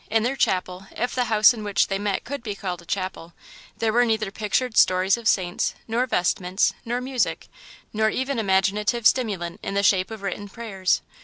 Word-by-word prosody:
In 220 0 +2
their 255 +3 0
chapel, 185 -4 -1
if 245 +2 -1
the 250 -1 0
house 215 0 +5
in 220 -3 -7
which 205 -3 +2
they 195 0 -2
met 205 -1 -1
could 280 0 -5
be 210 -4 -5
called 180 -3 -5
a 170 - -19
chapel, 185 -3 -4 0.4
there 220 -1 0
were 240 +1 +5
neither 220 -4 0
pictured 220 +3 -1
stories 185 +1 +4
of 235 -2 -5
saints, 180 -3 +1
nor 235 +3 0
vestments, 180 -1 +1
nor 240 +2 -2
music, 255 -1 -1 0.5
nor 220 0 +2
even 260 +2 -2
imaginative 210 +3 +1
stimulant 200 -8 +1
in 195 - -4
the 200 - +1
shape 190 -2 +3
of 220 -2 -8
written 200 +1 -4
prayers. 195 -4 -1
210 Hz, 190 wpm, -24 LUFS, 190-235 Hz, 0.5 s, house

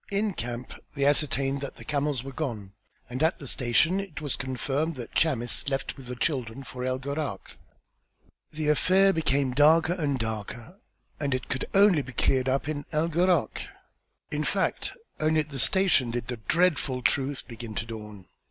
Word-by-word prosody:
In 205 0 0
camp 120 -2 -5 0.2
they 140 -1 +1
ascertained 140 -1 +2
that 140 - -5
the - - -11
camels 145 -4 0
were 135 - -6
gone, 115 -9 -4 0.3
and 125 +3 -5
at 160 +1 +3
the 140 - -8
station 130 +11 +2
it 195 -6 -6
was 145 -4 -2
confirmed 135 +5 -2
that 120 -3 -8
Chamis 130 -4 0
left 135 -1 -2
with 135 -3 -12
the 125 - -5
children 125 -1 -2
for 125 -1 -7
El 130 0 0
Gharak. 140 +3 -4 1.0
The 155 -1 -1
affair 190 +6 +4
became 140 -5 +1
darker 160 +5 +5
and 150 -6 0
darker 115 - -5 0.4
and 140 -3 0
it 130 - -5
could 130 - -1
be 195 -6 +5
cleared 130 +3 +2
up 135 +2 0
only 155 -1 -1
in 145 - -10
El 160 +1 +1
Gharak. 175 +2 +2 0.7
In - - -1
fact, - - -1 0.3
only 155 0 +3
at 150 - -8
that 140 -2 -6
station 185 -7 +3
did 120 0 -3
the 125 - -3
dreadful 140 - +1
truth 140 +2 0
begin 115 -2 -8
to 110 - -2
dawn. 105 -4 -8
140 Hz, 175 wpm, -27 LUFS, 125-155 Hz, 1.0 s, darker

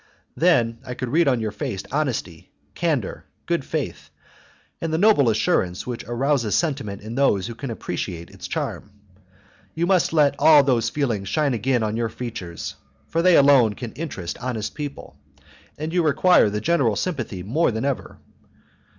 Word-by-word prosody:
Then 120 -10 +2
I 125 - -6
could 125 0 -4
read 165 +4 +3
on 125 -3 +3
your 110 -1 -2
face 95 -2 -4
honesty, 130 - -2 0.2
candour, - - -2 0.2
good - - 0
faith, - - -4 0.7
and 165 - -2
the 160 - +1
noble 180 - +5
assurance 95 -4 0
which 120 -2 -5
arouses 120 -2 0
sentiment 135 - -2
in 110 +2 -6
those 120 -8 +2
who 115 - -5
can 130 +3 -6
appreciate 90 -5 -5
its - - -9
charm. - - -4 0.9
You 165 +2 0
must 185 -1 +2
let 150 -4 +4
all 150 -1 +7
those 120 -4 +1
feelings 115 -8 -2
shine 150 -4 +1
again 120 +1 +1
on 110 0 -1
your 115 -1 -1
features; 110 -7 -6 0.3
for 165 - +1
they 180 0 +6
alone 135 -7 +5
can 120 -3 -7
interest 100 - -5
honest 120 -4 -3
people, 145 -2 -7 0.6
and 155 +2 -4
you 180 - +3
require 160 - +4
the 105 +1 -3
general 130 -6 +2
sympathy 120 - -3
more 145 - +1
than 110 +1 -2
ever. 140 -2 -3
125 Hz, 165 wpm, -23 LUFS, 110-150 Hz, 0.9 s, all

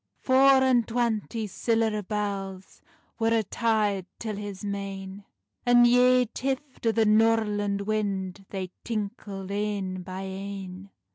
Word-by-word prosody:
Four 265 0 +5
and 245 -3 +3
twanty 230 -1 -1
siller 220 +1 0
bells 195 -2 -4 0.4
Wer 225 0 +2
a' 220 - +1
tyed 210 -3 0
till 220 -2 -4
his 205 -1 -6
mane, 195 0 -5 0.4
And 245 -1 +6
yae 250 +1 +5
tift 265 +2 -4
o - - +5
the 225 0 +2
norland 210 -2 +2
wind, 200 -2 -2
They 185 -2 -5
tinkled 200 -3 -5
ane 200 -2 -2
by 185 +1 -6
ane. 195 0 -7
210 Hz, 125 wpm, -27 LUFS, 195-230 Hz, 0.4 s, And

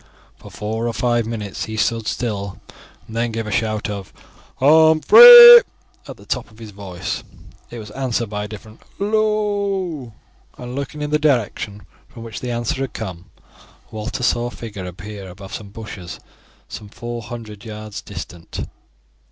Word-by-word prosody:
For - - -14
four 110 +2 -4
or 115 - -2
five 120 0 0
minutes 105 -4 -5
he 110 0 -6
stood 115 0 0
still, 100 -5 -4 0.5
and 110 - -11
then 115 0 -1
gave 115 0 -4
a 110 - -5
shout 110 0 -1
of 100 -3 -6 0.4
"Humphrey" 455 - +10 0.5
at - - -9
the - - -17
top - - -3
of 110 - -20
his 110 -2 -10
voice. 95 -3 -6 0.5
It 120 - -9
was 105 -2 -9
answered 120 -2 -2
by 105 0 -4
a - - -7
distant 110 +1 -12 0.2
"Hallo!" 200 - -1 0.5
and 125 0 -8
looking 140 +2 -5
in 150 - -4
the 150 - +2
direction 115 -7 -1 0.2
from 115 - -12
which 115 -2 -7
the 125 - -5
answer 120 +2 -2
had 135 - -4
come, 90 -5 -7 0.6
Walter 110 +4 -5
saw 120 0 +1
a - - -4
figure 105 -6 -8
appear 95 +2 -9
above 95 +2 -11
some 105 -2 -7
bushes 100 -4 -9 0.5
some 105 -2 -9
four 120 +2 -7
hundred 110 -2 -9
yards 110 -2 -8
distant. 85 -2 -8
115 Hz, 160 wpm, -20 LUFS, 105-130 Hz, 0.6 s, Humphrey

